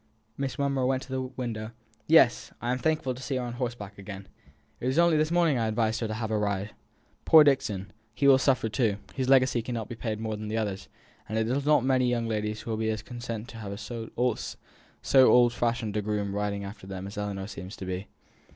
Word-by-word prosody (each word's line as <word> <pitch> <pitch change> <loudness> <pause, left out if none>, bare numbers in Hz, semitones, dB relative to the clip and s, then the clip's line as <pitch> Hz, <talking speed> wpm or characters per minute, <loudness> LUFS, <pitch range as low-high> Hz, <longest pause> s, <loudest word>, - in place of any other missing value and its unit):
Miss 135 -2 -3
Monro 140 -2 +1
went 130 0 0
to - - -14
the 130 0 -1
window. 120 -4 -5 0.3
"Yes! 155 -7 +5
I 120 - -2
am 125 - -1
thankful 155 -2 0
to 125 - -10
see 135 +1 -3
her 130 - -1
on 120 -1 -4
horseback 120 -5 -5
again. 95 -1 -8 0.5
It 125 - -3
was 130 +3 0
only 170 -1 +5
this 155 0 +2
morning 170 -6 +3
I 115 - +1
advised 110 0 0
her 115 - -1
to 110 - -3
have 110 -1 -3
a 110 - +1
ride!" 100 0 -1 0.5
"Poor 160 -1 +8
Dixon! 130 -10 0 0.2
he 140 - +2
will 135 -1 +7
suffer 130 -4 +2
too; 110 -2 +1 0.2
his 130 -1 -2
legacy 130 -3 +4
can 120 +2 -4
no 115 - -2
more - - -6
be 120 - -7
paid 110 -2 -3
than 110 -1 -4
the 110 +1 -2
others; 100 -3 -3 0.4
and 110 - -2
it 110 0 +1
is 135 +4 -1
not 150 -4 +4
many 130 -2 +3
young 120 -1 0
ladies 105 -1 -2
who 115 - -5
will 110 - -1
be 110 0 0
as 110 -1 -2
content 120 -2 -6
to 115 - -10
have 100 -2 -6
so 115 -1 -6 1.0
old 125 -3 +7
fashioned 115 -3 -1
a 105 - +1
groom 105 -1 -2
riding 100 0 -2
after 100 -1 -9
them 95 -1 -6
as 100 - -8
Ellinor 100 -2 -3
seems 95 -1 -8
to 95 - -7
be." 95 +1 -4
115 Hz, 230 wpm, -28 LUFS, 105-130 Hz, 1.0 s, Poor